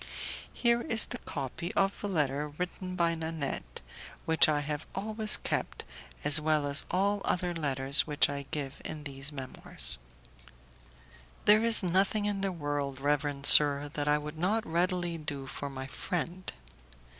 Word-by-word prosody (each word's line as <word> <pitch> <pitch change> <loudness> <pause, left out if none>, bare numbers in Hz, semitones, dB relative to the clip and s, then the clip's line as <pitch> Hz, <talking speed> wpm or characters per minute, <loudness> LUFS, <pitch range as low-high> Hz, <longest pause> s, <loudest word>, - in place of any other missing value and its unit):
Here 235 -1 0
is 225 -2 +3
the 245 - -7
copy 145 +4 -6
of 195 0 0
the 205 - -4
letter 150 -4 -1
written 180 +4 -6
by 170 -1 +1
Nanette, 160 - -5 0.4
which 160 0 +4
I 150 -1 0
have 150 +1 -5
always 215 +2 +2
kept, - - -4 0.4
as 150 +1 +7
well 155 -1 0
as 140 +1 +3
all 200 +2 0
other 180 0 -2
letters 140 -3 +1
which 150 -1 +2
I 140 -1 -6
give 140 -2 -6
in 155 -1 -7
these 135 0 -1
Memoirs: 130 - -1 1.5
"There 210 +2 +5
is 230 -3 +8
nothing 195 +4 +1
in 205 -1 -2
the 195 -1 -1
world, 145 -5 -4
reverend 145 0 -2
sir, 145 -1 +7
that 145 -1 -3
I 150 0 +3
would 150 +1 -8
not 210 +6 0
readily 175 0 -2
do 145 -3 -6
for 140 +1 -7
my 135 -1 -7
friend. 175 +5 -5
155 Hz, 155 wpm, -29 LUFS, 145-185 Hz, 1.5 s, is